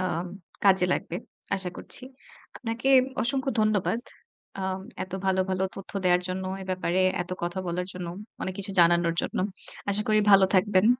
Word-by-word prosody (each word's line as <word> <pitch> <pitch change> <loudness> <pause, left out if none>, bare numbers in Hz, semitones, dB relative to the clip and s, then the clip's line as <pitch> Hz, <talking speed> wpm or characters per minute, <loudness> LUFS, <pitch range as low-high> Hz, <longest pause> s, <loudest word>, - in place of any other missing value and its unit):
আম 175 -1 -1 0.4
কাজে 190 -2 +6
লাগবে। 175 - -2 0.4
আশা 190 -2 -1
করছি। - - -4 0.5
আপনাকে 235 +2 -2 0.3
অসংখ্য 265 +3 +1
ধন্যবাদ। 215 +1 +2 0.6
আম 190 0 -2 0.2
এত 185 0 -8
ভালো, 190 0 +3
ভালো 185 0 0
তথ্য 195 - -9
দেওয়ার 180 0 +4
জন্য, 185 +1 -3 0.2
এ - - -7
ব্যাপারে 185 0 0 0.2
এত 175 - -13
কথা 175 +2 -2
বলার 180 +1 -2
জন্য, 180 -1 -6 0.4
অনেক 185 - -3
কিছু 200 0 -1
জানানোর 170 0 +4
জন্য। - - -3 0.5
আশা 205 +1 +3
করি 215 0 +4
ভালো 195 -1 +8
থাকবেন। 190 +1 +4
190 Hz, 160 wpm, -27 LUFS, 180-200 Hz, 0.6 s, ভালো